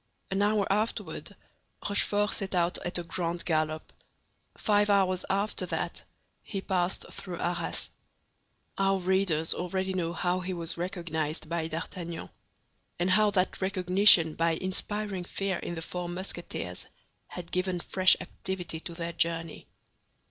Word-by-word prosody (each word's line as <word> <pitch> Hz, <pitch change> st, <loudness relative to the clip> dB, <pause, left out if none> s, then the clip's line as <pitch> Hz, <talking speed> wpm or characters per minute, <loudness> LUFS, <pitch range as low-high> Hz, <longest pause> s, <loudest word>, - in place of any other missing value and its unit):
An 195 Hz, +1 st, +1 dB
hour 205 Hz, -1 st, +3 dB
afterward 215 Hz, +3 st, -2 dB, 0.5 s
Rochefort 205 Hz, 0 st, +2 dB
set 195 Hz, -2 st, -1 dB
out 175 Hz, 0 st, +2 dB
at 175 Hz, -, 0 dB
a 175 Hz, -, -3 dB
grand 170 Hz, 0 st, -2 dB
gallop; 155 Hz, -1 st, 0 dB, 0.6 s
five 205 Hz, -1 st, +3 dB
hours 185 Hz, -2 st, +3 dB
after 200 Hz, +2 st, 0 dB
that -, -, -2 dB, 0.4 s
he 200 Hz, -, -4 dB
passed 185 Hz, -1 st, 0 dB
through 180 Hz, -3 st, -6 dB
Arras. 175 Hz, -1 st, 0 dB, 0.9 s
Our 195 Hz, 0 st, +3 dB
readers 185 Hz, -4 st, +2 dB
already 190 Hz, +1 st, -2 dB
know 170 Hz, -2 st, -1 dB
how 180 Hz, +1 st, 0 dB
he 185 Hz, 0 st, -3 dB
was 170 Hz, -2 st, -3 dB
recognized 165 Hz, -4 st, -3 dB
by 165 Hz, -1 st, -1 dB
D'Artagnan, 165 Hz, +1 st, -5 dB, 0.7 s
and 180 Hz, +2 st, +1 dB
how 210 Hz, +2 st, +5 dB
that 190 Hz, -1 st, +1 dB
recognition 185 Hz, -3 st, +6 dB
by 165 Hz, +1 st, +2 dB
inspiring 190 Hz, +2 st, -2 dB
fear 195 Hz, +1 st, -2 dB
in 170 Hz, -, -4 dB
the 165 Hz, -, -5 dB
four 180 Hz, 0 st, -4 dB
Musketeers 185 Hz, +2 st, -5 dB, 0.4 s
had 175 Hz, -2 st, -8 dB
given 185 Hz, -1 st, 0 dB
fresh 185 Hz, +2 st, +5 dB
activity 180 Hz, -2 st, -5 dB
to 170 Hz, +1 st, -7 dB
their 170 Hz, 0 st, -4 dB
journey. 165 Hz, -1 st, -1 dB
180 Hz, 135 wpm, -29 LUFS, 170-195 Hz, 0.9 s, recognition